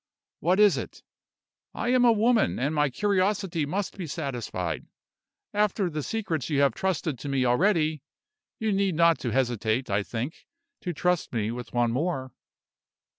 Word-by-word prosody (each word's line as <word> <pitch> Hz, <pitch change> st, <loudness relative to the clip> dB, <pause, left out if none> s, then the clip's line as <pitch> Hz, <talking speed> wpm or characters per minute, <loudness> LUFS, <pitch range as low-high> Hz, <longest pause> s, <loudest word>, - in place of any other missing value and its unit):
What 180 Hz, +5 st, +2 dB
is 210 Hz, -2 st, +6 dB
it? -, -, -8 dB, 0.7 s
I 240 Hz, -, -2 dB
am 250 Hz, 0 st, +4 dB
a 235 Hz, -, +7 dB
woman, 225 Hz, +1 st, +3 dB
and 140 Hz, +5 st, 0 dB
my 150 Hz, -2 st, +2 dB
curiosity 190 Hz, -1 st, 0 dB
must 195 Hz, +4 st, -3 dB
be 175 Hz, -, -4 dB
satisfied. 120 Hz, -, -4 dB, 0.7 s
After 205 Hz, -3 st, +1 dB
the 155 Hz, 0 st, -3 dB
secrets 165 Hz, -, -2 dB
you 145 Hz, -2 st, +2 dB
have 140 Hz, -4 st, +4 dB
trusted 160 Hz, -5 st, -2 dB
to 145 Hz, -, -5 dB
me 135 Hz, -2 st, +1 dB
already, 155 Hz, +2 st, +2 dB, 0.6 s
you 220 Hz, -1 st, -1 dB
need 195 Hz, -3 st, +1 dB
not 170 Hz, -3 st, +4 dB
hesitate, 120 Hz, -1 st, 0 dB
I 100 Hz, +1 st, +2 dB
think, 120 Hz, +8 st, -5 dB, 0.3 s
to 180 Hz, -, -3 dB
trust 180 Hz, +1 st, 0 dB
me 110 Hz, -1 st, -1 dB
with 120 Hz, +1 st, -7 dB
one 120 Hz, -1 st, +1 dB
more." 130 Hz, -1 st, -2 dB
155 Hz, 155 wpm, -27 LUFS, 125-195 Hz, 0.7 s, a